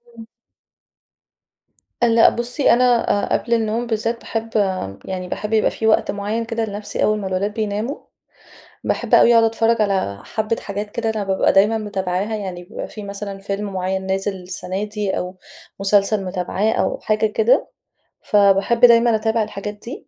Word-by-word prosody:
امم. 225 -1 -10 1.8
لأ 230 -1 +6
بُصّي، 245 +3 +1
أنا 245 -1 +3 0.2
أ - - +5
قبل 235 - -3
النوم 230 +1 0
بالذات 230 +1 -1
باحب 225 0 -4 0.6
يعني 185 -1 -5
باحب 210 +4 -4
يبقى 220 - +3
في 220 - -2
وقت 220 - +3
معيّن 210 +3 -3
كده 230 0 -2
لنفسي 205 0 -4
أول 215 0 +2
ما 195 - -4
الولاد 190 +2 -1
بيناموا. 215 +5 -2 0.9
باحب - - +1
أوي 235 - +6
أقعد 230 -1 +6
أتفرّج 225 0 +2
على 190 - -1
حبّة 220 +1 -2
حاجات 205 +1 -5
كده 230 0 -2
أنا 215 -2 -2
بابقى 190 -1 +1
دايمًا 205 +3 +4
متابعاها. 200 0 -2
يعني 185 -4 -6
بيبقى 180 - -7
في 210 - -9
مثلًا 200 0 -6
فيلم 200 +1 -4
معيّن 190 +1 -2
نازل 195 +1 -1
السنة 185 +2 -5
دي، 210 -2 -3
أو 180 +1 -4 0.4
مسلسل 200 +1 +2
متابعاه 185 +3 -1
أو - - -1
حاجة 215 0 0
كده. 220 +2 +2 0.5
فباحب 200 +2 +3
دايمًا 235 -1 +6
أتابع 220 0 +1
الحاجات 205 0 -6
دي. 230 +6 -10
210 Hz, 160 wpm, -20 LUFS, 195-225 Hz, 1.8 s, لأ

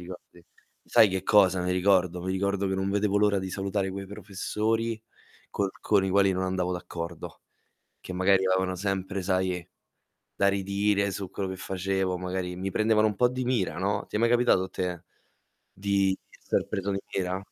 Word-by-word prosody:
ricordi? 90 -1 -11 0.4
Sai 110 - +6
che 95 -1 -2
cosa 95 -2 +4
mi 90 - -1
ricordo? 90 -1 +2
Mi 95 +1 -2
ricordo 100 +1 0
che 95 - -1
non 95 0 -1
vedevo 100 0 +1
l'ora 105 -1 +3
di 95 0 -4
salutare 95 0 -2
quei 95 0 -6
professori 110 +3 -2 0.5
col 100 - 0
con 100 -2 +3
i - - 0
quali 100 0 +4
non 95 0 -1
andavo 90 -1 -1
d'accordo, 85 -2 -7 0.6
che - - -8
magari 95 +1 +3
avevano 95 0 +1
sempre, 95 0 -2
sai, 95 -1 -1 0.7
da 100 - +2
ridire 100 +1 +1
su 95 0 -5
quello 95 0 -3
che 95 - -5
facevo, 95 0 -1
magari 90 0 -3
mi 95 +1 -3
prendevano 110 +2 +3
un 105 - -4
po' 125 - +4
di 130 +1 -3
mira, 105 -10 0
no, 100 +3 -1
ti - - -14
è - - +1
mai 115 - +4
capitato 120 -5 +4
a - - -7
te 90 -1 -4 0.7
di 100 -1 +1
esser - - -2
preso 100 -1 -2
di 100 0 -1
mira? 95 -1 -1
95 Hz, 180 wpm, -27 LUFS, 95-100 Hz, 0.7 s, Sai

